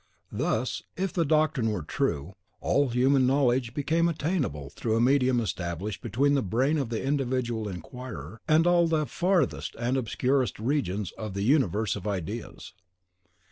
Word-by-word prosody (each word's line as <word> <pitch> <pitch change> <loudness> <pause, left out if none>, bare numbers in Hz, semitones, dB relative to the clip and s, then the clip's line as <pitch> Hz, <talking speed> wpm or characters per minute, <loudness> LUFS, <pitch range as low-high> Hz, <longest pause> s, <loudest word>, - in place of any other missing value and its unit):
Thus, - - -1 0.2
if 190 -1 -1
the 170 - +2
doctrine 155 -5 +2
were 105 -7 -2
true, 75 +3 -2 0.3
all 140 -1 +2
human 130 +2 +3
knowledge 125 -3 +2
became 165 +4 +2
attainable 145 - -2
through 110 -2 -1
a - - +2
medium 130 0 +3
established 95 -1 -3
between 130 +6 +1
the 140 - +3
brain 130 - +1
of 135 -5 -2
the 115 -2 -3
individual 125 -5 -1
inquirer 110 - -8
and 160 +1 +4
all 175 -1 +4
the 160 -2 +1
farthest 175 -2 0
and 120 +3 0
obscurest 130 +1 0
regions 105 - -1
in 110 -3 -5
the 100 0 -2
universe 110 - +2
of 95 - -6
ideas. 100 +3 -5
125 Hz, 150 wpm, -27 LUFS, 105-145 Hz, 0.3 s, and